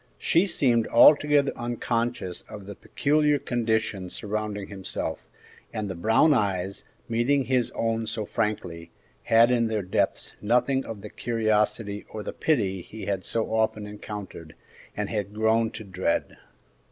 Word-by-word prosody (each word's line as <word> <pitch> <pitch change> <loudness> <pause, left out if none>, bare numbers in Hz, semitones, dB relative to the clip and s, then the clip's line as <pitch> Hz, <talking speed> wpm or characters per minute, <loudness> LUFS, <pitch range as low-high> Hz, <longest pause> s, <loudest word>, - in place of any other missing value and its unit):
She 175 +4 +2
seemed 120 - +2
altogether 145 +3 +6
unconscious 120 -4 -2
of 105 -3 -9
the 100 - -7
peculiar 150 +6 +1
conditions 110 -7 -1
surrounding 105 -1 -3
himself, 95 - -4 0.4
and 105 -1 -3
the 95 - -4
brown 110 - +4
eyes, 100 -5 -1 0.2
meeting 120 +4 +2
his 125 -2 +1
own 115 -1 -1
so 110 -1 -3
frankly, 85 -7 -3 0.4
had 115 +2 +5
in 120 -2 +2
their 110 -2 -1
depths 90 - -1
nothing 125 +5 +2
of 110 -3 -7
the 105 - -9
curiosity 110 -2 0
or 110 - -6
the - - -5
pity 100 - 0
he 110 +5 -9
had 95 -2 -2
so 115 -1 -2
often 110 -1 +1
encountered, 105 -6 -8 0.4
and - - -2
had 105 -2 -3
grown 110 +1 +2
to 110 - -8
dread. 95 -3 -1
110 Hz, 140 wpm, -26 LUFS, 100-120 Hz, 0.4 s, altogether